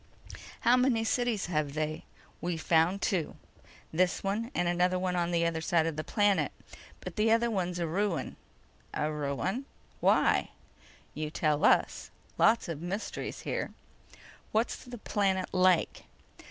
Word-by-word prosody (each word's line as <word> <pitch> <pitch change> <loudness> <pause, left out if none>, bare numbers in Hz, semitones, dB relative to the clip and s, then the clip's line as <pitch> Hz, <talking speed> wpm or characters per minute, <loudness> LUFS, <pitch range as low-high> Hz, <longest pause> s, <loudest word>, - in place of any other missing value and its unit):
"How 240 +2 +5
many 250 -3 +2
cities 235 -2 0
have 155 -4 -1
they?" 155 0 -2 0.4
"We've 170 0 -2
found 165 +4 +2
two. 180 -7 0 0.6
This 180 +2 +1
one 210 +4 -1
and 175 0 +1
another 180 +1 +2
on 180 -2 0
the 170 -1 +1
other 165 -1 -1
side 165 -1 +2
of 165 -2 -2
the 155 - -3
planet. 205 0 +2 0.5
But - - -8
the 215 +1 +3
other 230 +1 +3
one's 180 -4 -1
a 170 - -1
ruin." 180 +1 -1 0.6
"A 150 +1 0
ruin? 150 - -2 0.3
Why?" - - +3 0.6
"You 155 0 -3
tell 150 -1 0
us. - - +3 0.3
Lots 225 -1 +4
of 165 -3 -5
mysteries 190 +5 -4
here." - - -3 0.8
"What's 220 +2 +1
the 245 -1 -9
planet 195 -3 0
like?" 185 -2 +2
180 Hz, 140 wpm, -30 LUFS, 160-210 Hz, 0.8 s, How